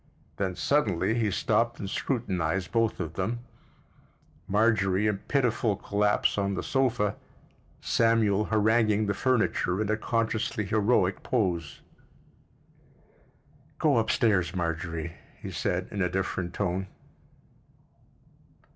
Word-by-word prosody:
Then 95 Hz, -2 st, -1 dB
suddenly 110 Hz, -, +1 dB
he 115 Hz, -2 st, +1 dB
stopped 115 Hz, +4 st, 0 dB
and 100 Hz, -, -4 dB
scrutinized 95 Hz, -, -2 dB
both 115 Hz, -1 st, +1 dB
of 80 Hz, -3 st, -4 dB
them—Marjorie 105 Hz, -1 st, -2 dB
in 105 Hz, -2 st, 0 dB
pitiful 120 Hz, -6 st, 0 dB
collapse 105 Hz, +1 st, +1 dB
on 100 Hz, 0 st, 0 dB
the -, -, -3 dB
sofa, 125 Hz, -6 st, 0 dB, 0.6 s
Samuel 110 Hz, -3 st, +2 dB
haranguing 110 Hz, 0 st, +2 dB
the 100 Hz, -, 0 dB
furniture 110 Hz, -5 st, +1 dB
in 110 Hz, -1 st, 0 dB
a 110 Hz, -, +1 dB
consciously 110 Hz, -1 st, -1 dB
heroic 100 Hz, -2 st, +2 dB
pose. 85 Hz, -, -1 dB, 2.0 s
"Go 145 Hz, -5 st, +3 dB
up 115 Hz, -1 st, +1 dB
stairs, 100 Hz, -5 st, +2 dB
Marjorie," 85 Hz, -1 st, -3 dB, 0.3 s
he -, -, -7 dB
said, -, -, -2 dB
in 100 Hz, -, -3 dB
a 90 Hz, -, +1 dB
different 95 Hz, -1 st, -3 dB
tone. 95 Hz, -1 st, -1 dB
105 Hz, 110 wpm, -27 LUFS, 95-115 Hz, 2.0 s, Go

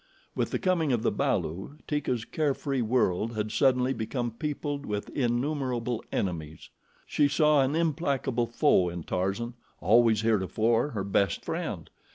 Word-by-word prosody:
With -, -, -1 dB
the -, -, -1 dB
coming 175 Hz, -6 st, +1 dB
of 120 Hz, -3 st, +1 dB
the -, -, +2 dB
balu, 95 Hz, -, -2 dB
Teeka's 130 Hz, -6 st, -1 dB
care 150 Hz, -3 st, 0 dB
free 135 Hz, -3 st, -2 dB
world 115 Hz, -2 st, +1 dB
had 105 Hz, 0 st, -2 dB
suddenly 130 Hz, -1 st, +3 dB
become 120 Hz, +1 st, -3 dB
peopled 145 Hz, +3 st, -3 dB
with 105 Hz, -5 st, -4 dB
innumerable 125 Hz, -2 st, -1 dB
enemies. 80 Hz, -5 st, -4 dB, 0.3 s
She 145 Hz, -, +2 dB
saw 150 Hz, 0 st, +4 dB
an 135 Hz, +3 st, +1 dB
implacable 140 Hz, -7 st, 0 dB
foe 115 Hz, -, +3 dB
in 85 Hz, -1 st, -6 dB
Tarzan, 95 Hz, +8 st, -2 dB, 0.3 s
always 115 Hz, -1 st, +4 dB
heretofore 115 Hz, +4 st, +2 dB
her 100 Hz, -3 st, -2 dB
best 100 Hz, -2 st, 0 dB
friend. -, -, -3 dB
120 Hz, 145 wpm, -28 LUFS, 110-140 Hz, 0.3 s, saw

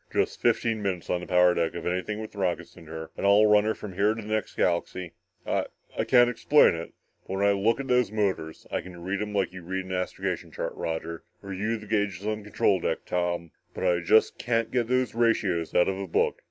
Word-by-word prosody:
"Just -, -, 0 dB
fifteen 115 Hz, -2 st, +1 dB
minutes 95 Hz, -4 st, -2 dB
on 90 Hz, -, 0 dB
the -, -, -8 dB
power 90 Hz, -1 st, +5 dB
deck 85 Hz, -2 st, -1 dB
of -, -, -5 dB
anything 90 Hz, +4 st, -2 dB
with 110 Hz, -, -7 dB
rockets 95 Hz, -4 st, -2 dB
in 80 Hz, -, -13 dB
her 80 Hz, 0 st, -7 dB
and -, -, -6 dB
I'll 100 Hz, +2 st, +6 dB
run 105 Hz, 0 st, +5 dB
her 110 Hz, -, 0 dB
from 100 Hz, -3 st, -8 dB
here 105 Hz, +4 st, +2 dB
to 115 Hz, -, -6 dB
the 110 Hz, +1 st, -4 dB
next 110 Hz, -, -2 dB
galaxy. 90 Hz, 0 st, -1 dB, 0.3 s
I -, -, 0 dB, 0.3 s
I -, -, 0 dB
can't 120 Hz, -1 st, +6 dB
explain 125 Hz, +5 st, +4 dB
it, 85 Hz, 0 st, -7 dB, 0.3 s
but 95 Hz, -, -3 dB
when 100 Hz, -, +2 dB
I -, -, +5 dB
look 100 Hz, +5 st, +2 dB
at 135 Hz, -, -4 dB
those 125 Hz, -4 st, +2 dB
motors, 95 Hz, -7 st, -2 dB
I -, -, -1 dB
can 90 Hz, -1 st, -11 dB
read 95 Hz, +3 st, -2 dB
'em 105 Hz, -1 st, -4 dB
like 95 Hz, -3 st, 0 dB
you 95 Hz, -, -8 dB
read 95 Hz, +2 st, -4 dB
an 95 Hz, -, -8 dB
astrogation 90 Hz, 0 st, -3 dB
chart, -, -, -4 dB
Roger, 80 Hz, 0 st, -4 dB, 0.2 s
or 100 Hz, 0 st, -6 dB
you 105 Hz, +5 st, -1 dB
the 105 Hz, -, -11 dB
gauges 100 Hz, -2 st, -1 dB
on 110 Hz, 0 st, -1 dB
the 105 Hz, -, -13 dB
control 100 Hz, -2 st, +2 dB
deck, -, -, -2 dB
Tom. 85 Hz, -2 st, -2 dB, 0.2 s
But -, -, -4 dB
I 85 Hz, -1 st, +3 dB
just 95 Hz, +6 st, +3 dB
can't 115 Hz, -1 st, 0 dB
get 120 Hz, -3 st, +1 dB
those 130 Hz, 0 st, +1 dB
ratios 105 Hz, -8 st, +1 dB
out 90 Hz, -, +5 dB
of 95 Hz, 0 st, -1 dB
a 100 Hz, -, -4 dB
book. -, -, +1 dB
100 Hz, 240 wpm, -27 LUFS, 90-110 Hz, 0.3 s, I'll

